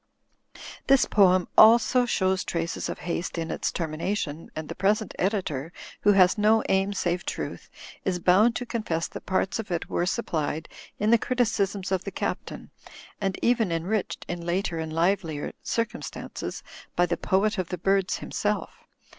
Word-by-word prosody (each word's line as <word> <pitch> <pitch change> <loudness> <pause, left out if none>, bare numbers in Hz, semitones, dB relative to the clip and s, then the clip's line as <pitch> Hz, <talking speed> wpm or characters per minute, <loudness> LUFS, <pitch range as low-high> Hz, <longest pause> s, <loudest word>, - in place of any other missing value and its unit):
This 270 -1 +5
poem 185 -3 +4
also 235 +2 +6
shows 190 -4 +1
traces 165 0 -3
of - - -4
haste 175 0 -3
in 165 -1 -3
its - - -1
tennina 165 +4 -2
tion, 155 -3 -5
and 155 0 -5
the - - -5
present 210 +3 0
editor 175 -7 -1 0.3
(who 205 - +5
has 185 +2 +5
no 215 +1 +4
aim 195 +1 +2
save 180 -2 -1
truth) - - -5 0.3
is 185 -2 0
bound 195 +7 +4
to 245 - -3
confess 215 -9 -2
that - - -9
parts 190 +2 0
of 215 -2 -5
it 175 -2 -3
were 175 - 0
sup 235 +5 -1
plied 155 0 -2 0.3
in 210 +2 +1
the 235 - +6
criticisms 210 -7 0
of 190 -1 0
the - - -4
Captain, 190 - -5 0.5
and 195 -2 -1
even 230 -6 +2
en 165 -1 -1
riched 205 +2 -2
(in 175 -1 -4
later 175 -1 -1
and 160 -1 -4
livelier 165 -2 0
circumstances) 230 +1 -4 0.3
by 175 - +4
the 175 -1 -1
Poet 205 +2 +1
of 185 - -2
the 180 - -3
Birds 195 +2 +1
himself. 210 0 -2
190 Hz, 170 wpm, -26 LUFS, 170-210 Hz, 0.5 s, also